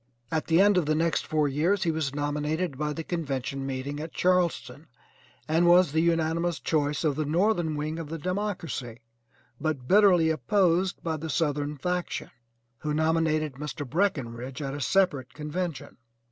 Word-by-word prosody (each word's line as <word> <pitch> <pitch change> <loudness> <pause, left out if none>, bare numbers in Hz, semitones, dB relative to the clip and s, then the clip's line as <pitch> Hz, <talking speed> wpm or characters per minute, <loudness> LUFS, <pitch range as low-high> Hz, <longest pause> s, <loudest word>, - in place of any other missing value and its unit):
At 160 -1 -1
the 165 +1 +4
end 205 0 +5
of 160 - -2
the 155 - +2
next 165 +1 0
four 155 -1 +1
years 170 +8 +1
he 170 - +1
was 155 -3 -2
nominated 150 +2 -1
by 150 +2 -2
the 165 +2 -4
convention 140 -5 -3
meeting 135 +2 -4
at 160 +1 -6
Charleston, 170 -6 0 0.6
and 165 +3 +3
was 175 -2 +6
the 160 +2 +2
unanimous 165 0 +1
choice 150 -2 0
of 150 -3 +1
the 155 - -1
northern 170 +1 +1
wing 155 +2 -3
of 160 -3 -6
the 165 - -4
Democracy, 170 - -4 0.6
but 150 -6 -2
bitterly 185 -5 +5
opposed 180 - +1
by 160 -2 -1
the 160 +1 -6
Southern 150 -2 -1
faction, 180 +4 -3 0.5
who 150 -1 -2
nominated 160 -1 +1
Mr. 145 -1 -5
Breckinridge 130 -7 -2
at 135 -2 -4
a 145 - -5
separate 140 -3 +1
convention. 155 -1 -4
155 Hz, 160 wpm, -27 LUFS, 145-175 Hz, 0.6 s, was